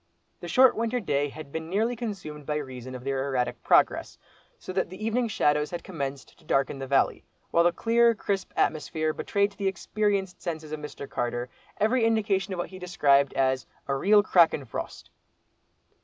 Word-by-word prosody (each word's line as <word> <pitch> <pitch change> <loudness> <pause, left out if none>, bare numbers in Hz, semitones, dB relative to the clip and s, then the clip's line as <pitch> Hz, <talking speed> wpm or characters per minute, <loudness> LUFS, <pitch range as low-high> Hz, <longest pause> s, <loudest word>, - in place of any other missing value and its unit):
The - - -7
short 260 0 +5
winter 230 +2 0
day 145 -8 0
had 145 0 -10
been 160 +1 -5
nearly 220 +6 +1
consumed 185 - -6
by 150 - -1
reason 130 -3 -6
of 125 - -8
their 135 0 -1
erratic 125 -3 -1
progress; - - +2 0.4
so 185 - -8
that 190 -2 0
the 185 +4 -7
evening 235 +2 +1
shadows 150 -8 +1
had 175 - -5
commenced 140 -6 -6
to - - -22
darken 135 0 0
the 135 - -5
valley, 135 +1 +2 0.3
while 170 - +4
the 175 - +5
clear, 230 +5 +3
crisp 195 -2 -2
atmosphere 155 0 0
betrayed 200 +4 0
to - - -21
the 200 - 0
experienced 195 0 -1
senses 160 -3 -5
of 155 - -4
Mr. 150 -1 -8
Carter, 120 0 -3 0.3
every 225 +3 +2
indication 205 -3 +1
of 185 - -3
what 175 - -3
he 185 - -10
described 140 -6 +3
as 130 -1 +1 0.2
"a 140 - 0
real 205 +9 +5
crackin' 165 -7 +4
frost." - - -7
170 Hz, 185 wpm, -27 LUFS, 140-205 Hz, 0.4 s, short